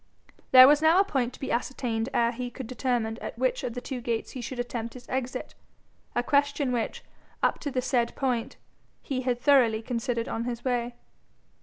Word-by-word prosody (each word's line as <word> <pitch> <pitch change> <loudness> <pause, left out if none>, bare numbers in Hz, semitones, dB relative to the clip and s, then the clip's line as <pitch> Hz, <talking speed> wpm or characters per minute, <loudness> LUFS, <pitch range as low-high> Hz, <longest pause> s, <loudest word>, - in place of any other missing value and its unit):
There 255 0 +10
was 295 +1 +5
now 320 +3 +5
a - - +6
point 265 -10 -1
to - - -13
be 270 - -4
ascertained 235 -1 -1
ere 235 -3 +2
he 245 +1 -5
could 260 +1 -8
determine 240 -2 -1
at - - -6
which - - 0
of 235 - -4
the 245 - -4
two 255 -2 -5
gates 230 -2 -2
he 255 - -6
should 250 +2 -6
attempt 240 -1 -4
his 250 - -11
exit 255 -1 -3 0.6
a 240 - +1
question 285 0 +1
which, 240 -2 -2 0.4
up - - +2
to 290 - -3
the 255 -2 -2
said 245 -3 0
point, 250 -4 -1 0.5
he 260 -2 -2
had 250 -1 -1
thoroughly 245 -6 +4
considered 235 0 -2
on 230 - -3
his 240 0 -5
way. 245 -1 -1
245 Hz, 195 wpm, -27 LUFS, 235-265 Hz, 0.6 s, There